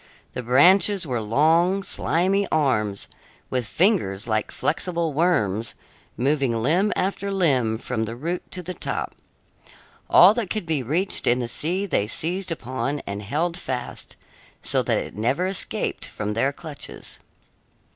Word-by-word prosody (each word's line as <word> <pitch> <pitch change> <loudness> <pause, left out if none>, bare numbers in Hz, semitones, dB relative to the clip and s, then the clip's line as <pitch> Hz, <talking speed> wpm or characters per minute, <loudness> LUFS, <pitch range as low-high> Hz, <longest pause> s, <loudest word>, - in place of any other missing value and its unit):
The - - -3
branches 175 - +5
were 125 -5 -2
long, 165 - +3
slimy 195 +2 +1
arms, 110 -10 +1 0.4
with 125 -3 -1
fingers 110 - +1
like 110 -1 0
flexible 170 -1 -1
worms, 115 - +1 0.4
moving 135 0 +1
limb 165 - +2
after 200 +1 -1
limb 130 - +2
from 110 -1 -3
the 115 +1 -6
root 170 +8 -4
to 180 - -4
the 180 +2 -5
top. - - -4 1.0
All 185 +4 +8
that 225 -5 -3
could 215 -5 -2
be 160 -4 0
reached 165 - -1
in 120 - +4
the 120 -2 -2
sea 175 +11 -1
they 105 - 0
seized 180 - -2
upon 135 0 -3
and 100 +1 -5
held 165 - -2
fast, 125 -5 -5 0.5
so - - +2
that - - +1
it - - -5
never 125 - 0
escaped 190 0 -1
from 105 0 -4
their 130 +6 +1
clutches. 150 0 -8
150 Hz, 145 wpm, -24 LUFS, 115-180 Hz, 1.0 s, All